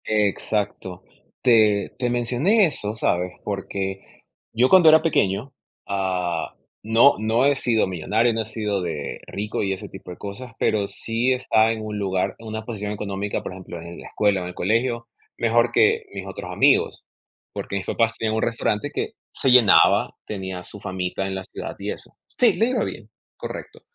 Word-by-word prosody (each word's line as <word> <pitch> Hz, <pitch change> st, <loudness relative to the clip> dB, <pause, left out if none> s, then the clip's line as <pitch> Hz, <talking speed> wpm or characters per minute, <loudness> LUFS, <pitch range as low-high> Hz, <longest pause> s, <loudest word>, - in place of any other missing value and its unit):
Exacto. 105 Hz, -3 st, -1 dB, 0.4 s
Te 110 Hz, -5 st, +4 dB
te 125 Hz, -, -1 dB
mencioné 125 Hz, -, +3 dB
eso, 105 Hz, -8 st, -2 dB
¿sabes?, 90 Hz, -4 st, 0 dB
porque 95 Hz, 0 st, -4 dB, 0.5 s
yo 125 Hz, +3 st, +3 dB
cuando 180 Hz, -4 st, +8 dB
era 160 Hz, 0 st, +7 dB
pequeño, 115 Hz, -4 st, 0 dB, 0.3 s
ah, 90 Hz, -4 st, -2 dB, 0.3 s
no 115 Hz, +6 st, +5 dB
no 110 Hz, +4 st, +2 dB
he 140 Hz, 0 st, +4 dB
sido 115 Hz, -5 st, +1 dB
millonario, 105 Hz, +7 st, +1 dB
no 115 Hz, -, 0 dB
he -, -, -4 dB
sido 105 Hz, -3 st, -2 dB
de 80 Hz, -5 st, -4 dB
rico 105 Hz, +2 st, -3 dB
y 95 Hz, -1 st, 0 dB
ese 95 Hz, -, -7 dB
tipo 95 Hz, -1 st, -10 dB
de 90 Hz, -, -9 dB
cosas, 115 Hz, +5 st, -7 dB
pero 100 Hz, -2 st, +1 dB
sí 115 Hz, +5 st, 0 dB
estaba 115 Hz, -3 st, +2 dB
en 110 Hz, -1 st, -4 dB
un 105 Hz, -1 st, -4 dB
lugar, 95 Hz, -2 st, -1 dB
en 115 Hz, -, -10 dB
una 110 Hz, 0 st, -4 dB
posición 105 Hz, -3 st, -4 dB
económica, 100 Hz, -1 st, -3 dB
por -, -, -6 dB
ejemplo, 90 Hz, -2 st, -9 dB
en 85 Hz, +1 st, -9 dB
la -, -, -11 dB
escuela 100 Hz, -3 st, +1 dB
o -, -, -4 dB
en 90 Hz, -, -5 dB
el 90 Hz, -, -10 dB
colegio, 115 Hz, +4 st, 0 dB, 0.3 s
mejor 115 Hz, +1 st, +2 dB
que -, -, +3 dB
mis -, -, -6 dB
otros -, -, -7 dB
amigos, -, -, +3 dB, 0.5 s
porque -, -, -5 dB
mis 95 Hz, -, -5 dB
papás 115 Hz, -1 st, +1 dB
tenían 110 Hz, -1 st, -1 dB
un 110 Hz, -, 0 dB
restaurante 115 Hz, +2 st, -1 dB
que -, -, -3 dB, 0.2 s
se 135 Hz, -, 0 dB
llenaba, 125 Hz, -5 st, +6 dB
tenía 95 Hz, -3 st, -5 dB
su 100 Hz, +3 st, -11 dB
famita 95 Hz, -1 st, -3 dB
en 95 Hz, -, -4 dB
la 95 Hz, -, -4 dB
ciudad -, -, -7 dB
y -, -, -3 dB
eso -, -, -8 dB, 0.3 s
Sí, 245 Hz, -, +5 dB
le 225 Hz, -, +2 dB
iba 255 Hz, -, 0 dB
bien, -, -, -6 dB, 0.3 s
correcto. -, -, -8 dB
105 Hz, 185 wpm, -23 LUFS, 95-115 Hz, 0.5 s, cuando